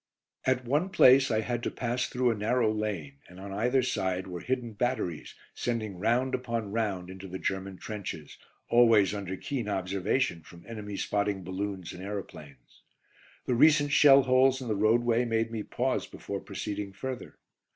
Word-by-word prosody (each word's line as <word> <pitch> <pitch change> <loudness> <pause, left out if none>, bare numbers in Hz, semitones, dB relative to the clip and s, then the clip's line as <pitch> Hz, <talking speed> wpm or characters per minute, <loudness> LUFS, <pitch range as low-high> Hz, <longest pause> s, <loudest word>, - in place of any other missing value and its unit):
At 130 -1 +1
one 150 +9 +1
place 135 -6 +6
I 110 -2 +1
had 120 +1 -2
to - - -1
pass 125 +1 -2
through 125 -1 +1
a - - -1
narrow 110 +2 +1
lane, 95 -11 -4
and 90 +1 -13
on 100 0 -7
either 125 +6 +2
side 95 -5 -1
were 90 -2 -6
hidden 125 +1 -3
batteries, 105 -8 -2 0.2
sending 110 -6 -3
round 120 +6 +1
upon 115 -5 -2
round 100 -5 -2
into 95 +1 -9
the 95 0 -6
German 95 0 -3
trenches, 90 -9 -7 0.3
always 115 -5 +5
under 95 -2 -4
keen 125 -4 -3
observation 95 0 -1
from 85 +2 -15
enemy 105 -3 -6
spotting 100 -2 -1
balloons 95 0 -4
and 90 - -9
aeroplanes. 75 -10 -8 0.6
The 125 - 0
recent 145 +3 +5
shell 140 -1 +7
holes 130 +1 +4
in 125 -3 -6
the 110 - +1
roadway 115 +3 +3
made 115 -1 0
me 110 -2 -3
pause - - -1
before - - -6
proceeding 100 -1 -5
further. 130 +5 -6
110 Hz, 165 wpm, -29 LUFS, 95-125 Hz, 0.6 s, shell